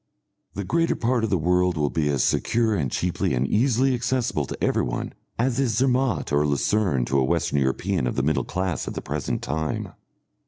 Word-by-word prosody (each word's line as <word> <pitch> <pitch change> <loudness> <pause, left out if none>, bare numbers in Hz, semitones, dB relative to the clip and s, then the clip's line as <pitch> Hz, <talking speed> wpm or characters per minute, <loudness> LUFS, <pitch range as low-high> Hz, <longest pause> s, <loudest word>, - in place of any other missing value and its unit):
The 100 - -3
greater 165 - +1
part 120 0 0
of 110 - 0
the 95 - +2
world 90 +1 +1
will 75 -1 0
be 75 -3 0
as 70 -3 +1
secure 115 -1 +1
and 70 -9 -1
cheaply 90 -6 -1
and 60 +1 +1
easily 130 - +2
accessible 125 - 0
to - - -6
everyone - - -1 0.2
as 125 +2 0
is 120 -5 +1
Zermatt 130 - +1
or 75 +1 +3
Lucerne 70 - +1
to 70 +3 +1
a - - +3
Western 70 +2 +1
European 70 +4 0
of - - -2
the 70 - 0
middle 75 +2 +1
class 90 -2 -3
at - - -5
the - - -4
present - - -3
time. 80 +3 -3
90 Hz, 195 wpm, -24 LUFS, 70-120 Hz, 0.2 s, or